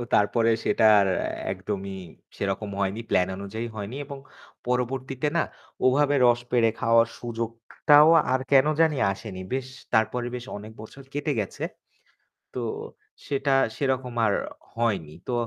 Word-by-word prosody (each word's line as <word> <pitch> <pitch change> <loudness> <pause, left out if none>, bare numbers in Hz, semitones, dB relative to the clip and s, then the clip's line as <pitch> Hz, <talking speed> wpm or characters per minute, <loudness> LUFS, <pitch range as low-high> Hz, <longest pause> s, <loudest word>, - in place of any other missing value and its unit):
তারপরে 115 +3 +3 0.2
সেটার 105 -3 +5 0.5
একদমই 95 0 -4 0.4
সেরকম 100 +2 -2
হয়নি। 100 +2 -1
প্ল্যান 90 0 +3
অনুযায়ী 110 +4 -5
হয়নি 105 +3 -5
এবং 140 0 -8 0.5
পরবর্তীতে 130 +2 -1
না 170 - +3 0.4
ওভাবে 145 +2 +4
রস 120 0 +4
পেরে 120 -2 +4
খাওয়ার 115 0 +4
সুযোগটাও 120 +6 +3 0.2
আর 130 - +2
কেন 135 0 +6 0.2
জানি 160 -3 +3 0.2
আসেনি। 95 -1 -8
বেশ 130 -1 -2 0.3
তারপরে 110 +2 +1
বেশ 120 -1 -6
অনেক 105 +2 -9
বছর 135 +5 -11
কেটে 145 +1 -1
গেছে। 100 - -4 0.9
তো - - -4 0.7
সেটা 140 0 0 0.2
সেরকম 130 -3 -1
আর 105 - +2 0.4
হয়নি। 100 -10 -1 0.2
তো - - -1
115 Hz, 130 wpm, -26 LUFS, 105-130 Hz, 0.9 s, কেন